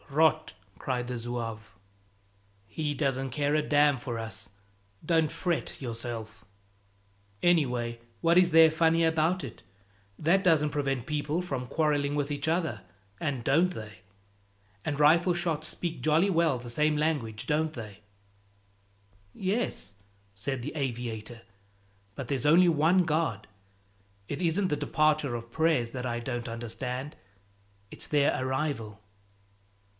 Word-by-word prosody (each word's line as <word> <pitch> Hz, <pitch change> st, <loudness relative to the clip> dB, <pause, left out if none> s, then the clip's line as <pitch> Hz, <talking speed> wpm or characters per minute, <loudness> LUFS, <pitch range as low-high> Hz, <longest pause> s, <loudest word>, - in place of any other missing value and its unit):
"Rot!" 155 Hz, +2 st, +2 dB, 0.2 s
cried 125 Hz, +1 st, -2 dB
the 125 Hz, 0 st, -3 dB
zouave. 115 Hz, -2 st, -4 dB, 1.1 s
"He 145 Hz, +8 st, -2 dB
doesn't 135 Hz, -2 st, -1 dB
care 145 Hz, +3 st, 0 dB
a 155 Hz, -, +3 dB
damn 145 Hz, -1 st, +3 dB
for 120 Hz, -1 st, -4 dB
us, 110 Hz, -1 st, -6 dB, 0.6 s
don't 160 Hz, -2 st, +2 dB
fret 175 Hz, -3 st, -2 dB
yourself." 115 Hz, -2 st, -6 dB, 1.0 s
"Anyway, 125 Hz, -9 st, +1 dB, 0.2 s
what 170 Hz, +1 st, +3 dB
is 180 Hz, -1 st, +5 dB
there 160 Hz, 0 st, +7 dB
funny 165 Hz, +1 st, +3 dB
about 160 Hz, +2 st, +1 dB
it? 130 Hz, -, -8 dB, 0.6 s
That 180 Hz, +5 st, +3 dB
doesn't 155 Hz, -5 st, +3 dB
prevent 135 Hz, -4 st, -1 dB
people 150 Hz, +2 st, -1 dB
from 135 Hz, -8 st, -4 dB
quarreling 145 Hz, -1 st, +1 dB
with 145 Hz, -1 st, -1 dB
each 145 Hz, 0 st, -2 dB
other 160 Hz, -, -1 dB, 0.4 s
and 135 Hz, -6 st, -2 dB
don't 165 Hz, +9 st, +3 dB
they! 110 Hz, -, -9 dB, 0.8 s
And 145 Hz, -2 st, -2 dB
rifle 170 Hz, +4 st, +5 dB
shots 165 Hz, -3 st, -1 dB
speak 170 Hz, -2 st, -4 dB
jolly 160 Hz, +6 st, +3 dB
well 165 Hz, -6 st, +2 dB
the 120 Hz, 0 st, -9 dB
same 150 Hz, +5 st, +1 dB
language, 140 Hz, -9 st, -1 dB
don't 155 Hz, +1 st, +1 dB
they?" 105 Hz, -6 st, -8 dB, 1.3 s
"Yes," 190 Hz, -, -2 dB, 0.4 s
said 125 Hz, +6 st, -3 dB
the -, -, -5 dB
aviator, 120 Hz, -4 st, -4 dB, 0.7 s
"but 135 Hz, -, -6 dB
there's 135 Hz, -1 st, -1 dB
only 175 Hz, +4 st, +6 dB
one 170 Hz, +3 st, +4 dB
God. 155 Hz, -9 st, -1 dB, 0.8 s
It 145 Hz, -, -4 dB
isn't 180 Hz, +3 st, +2 dB
the 150 Hz, -, +1 dB
departure 155 Hz, -3 st, +1 dB
of 115 Hz, 0 st, -7 dB
prayers 155 Hz, -6 st, +1 dB
that 125 Hz, 0 st, -4 dB
I 120 Hz, -1 st, -2 dB
don't 120 Hz, -1 st, -4 dB
understand; 125 Hz, +4 st, -5 dB, 0.8 s
it's -, -, -2 dB
their 145 Hz, -1 st, +3 dB
arrival." 130 Hz, -6 st, -2 dB
145 Hz, 130 wpm, -29 LUFS, 120-160 Hz, 1.3 s, there